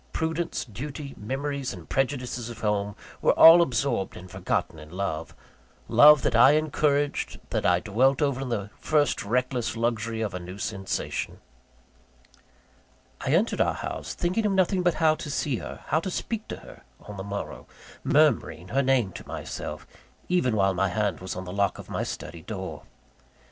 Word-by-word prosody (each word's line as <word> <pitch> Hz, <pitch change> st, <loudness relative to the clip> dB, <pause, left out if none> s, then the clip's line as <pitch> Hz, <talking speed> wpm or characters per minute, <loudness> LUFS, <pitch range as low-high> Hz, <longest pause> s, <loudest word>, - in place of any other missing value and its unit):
Prudence, 160 Hz, +1 st, -2 dB
duty, 135 Hz, +5 st, -7 dB
memories 135 Hz, +4 st, -3 dB
and -, -, -12 dB
prejudices 125 Hz, -3 st, -1 dB
of 120 Hz, -, -9 dB
home, 105 Hz, -1 st, 0 dB, 0.3 s
were -, -, +4 dB
all 165 Hz, +1 st, +10 dB
absorbed 130 Hz, -, 0 dB
and 90 Hz, 0 st, -11 dB
forgotten 80 Hz, -, -2 dB
in 75 Hz, 0 st, -12 dB
love 85 Hz, -3 st, -4 dB, 0.5 s
love 140 Hz, +5 st, +7 dB
that -, -, +1 dB
I 125 Hz, +5 st, +7 dB
encouraged, 145 Hz, -1 st, 0 dB
that -, -, +1 dB
I 90 Hz, 0 st, +3 dB
dwelt 125 Hz, +6 st, +2 dB
over 140 Hz, -3 st, 0 dB
in 135 Hz, -, -4 dB
the 105 Hz, -3 st, -3 dB
first 150 Hz, -2 st, +1 dB
reckless 125 Hz, +2 st, -1 dB
luxury 115 Hz, -1 st, -1 dB
of 105 Hz, -4 st, -2 dB
a 90 Hz, -, -3 dB
new 90 Hz, +2 st, -8 dB
sensation. 100 Hz, -2 st, -3 dB, 1.9 s
I -, -, -2 dB
entered -, -, +2 dB
our -, -, +2 dB
house, -, -, -5 dB
thinking 190 Hz, +5 st, 0 dB
of 200 Hz, -, +1 dB
nothing 190 Hz, 0 st, +2 dB
but 175 Hz, -2 st, +2 dB
how 155 Hz, -1 st, +4 dB
to 155 Hz, -, -6 dB
see 140 Hz, -3 st, -1 dB
her, -, -, -8 dB
how 155 Hz, -, +3 dB
to 190 Hz, -, -4 dB
speak 220 Hz, +4 st, -4 dB
to -, -, -5 dB
her, -, -, -13 dB, 0.2 s
on 105 Hz, -1 st, -9 dB
the 95 Hz, -, -5 dB
morrow; 100 Hz, 0 st, -6 dB, 0.4 s
murmuring 115 Hz, -, +2 dB
her 135 Hz, -, +2 dB
name 130 Hz, -7 st, +2 dB
to -, -, -10 dB
myself; -, -, -6 dB, 0.4 s
even 155 Hz, -11 st, +2 dB
while 95 Hz, -2 st, +3 dB
my 95 Hz, +1 st, +1 dB
hand 100 Hz, -1 st, -1 dB
was 95 Hz, 0 st, -5 dB
on 90 Hz, +1 st, -5 dB
the 90 Hz, -, -6 dB
lock 100 Hz, 0 st, +1 dB
of -, -, -10 dB
my -, -, -1 dB
study -, -, -6 dB
door. -, -, -6 dB
125 Hz, 175 wpm, -26 LUFS, 100-150 Hz, 1.9 s, all